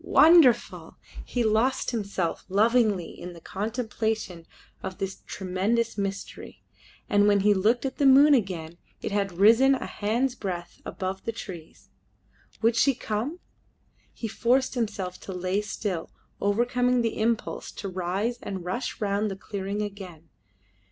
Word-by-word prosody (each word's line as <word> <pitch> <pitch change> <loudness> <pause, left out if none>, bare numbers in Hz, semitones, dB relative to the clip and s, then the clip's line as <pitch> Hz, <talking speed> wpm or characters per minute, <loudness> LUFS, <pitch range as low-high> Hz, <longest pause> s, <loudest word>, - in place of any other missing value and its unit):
Wonderful! 320 -7 +5 0.3
He 245 - -1
lost 225 +5 +1
himself 200 -7 -2
lovingly 215 -2 +2
in 180 0 -9
the 170 - -12
contemplation 220 -3 -3 0.3
of 190 - -6
this 195 0 -5
tremendous 200 +5 -1
mystery, 200 -1 -5 0.4
and 205 0 +4
when 205 -1 +4
he 205 +1 +5
looked 220 +7 +2
at 265 - -3
the 280 - +5
moon 280 +3 +7
again 175 - -1 0.2
it - - -3
had 200 -1 0
risen 230 +7 +6
a - - -5
hand's 235 +5 -1
breadth 180 -7 -6
above 190 0 -4
the 230 - -1
trees. 175 -7 -10 0.7
Would 230 0 +4
she 275 +2 +3
come? 240 +12 -3 0.7
He 225 - -5
forced 250 +4 +1
himself 205 -7 -3
to 190 - -8
lay 185 +2 -1
still, 200 -4 -4 0.3
overcoming 245 +4 +2
the 230 - -2
impulse 225 +1 -1
to 200 - -6
rise 190 +6 -2
and 190 -3 -6
rush 215 +8 -3
round 205 +1 0
the 195 - -4
clearing 200 +1 -4
again. 185 -6 -8
210 Hz, 140 wpm, -26 LUFS, 190-235 Hz, 0.7 s, moon